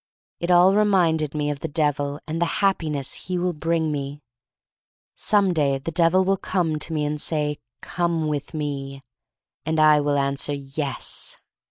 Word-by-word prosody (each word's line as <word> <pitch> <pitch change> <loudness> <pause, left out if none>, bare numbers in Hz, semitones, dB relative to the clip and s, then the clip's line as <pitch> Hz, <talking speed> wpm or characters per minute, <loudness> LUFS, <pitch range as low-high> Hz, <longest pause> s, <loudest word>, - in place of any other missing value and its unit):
It 170 - -3
all 180 +2 +6
reminded 175 -8 +2
me 150 -1 -1
of 145 - -6
the 165 - -4
Devil 145 -1 -1
and 160 +1 -4
the 170 - +2 0.2
Happiness 155 -8 0
he 185 -1 -1
will 180 0 -1
bring 160 0 -1
me. 140 0 -4 1.0
Some 200 -3 +3
day 140 -4 +1
the 135 +5 -5
Devil 170 +3 +3
will 195 +1 +2
come 175 -5 -1
to 165 - -3
me 150 -2 -1
and 150 0 -1
say: 150 -2 +1 0.2
"Come 170 -3 -1
with 150 +1 -4
me." 140 -2 -5 0.6
And 160 +1 -1
I 155 -1 +5
will 145 0 0
answer: 140 +1 -1
"Yes." 140 0 -2
155 Hz, 165 wpm, -23 LUFS, 145-170 Hz, 1.0 s, all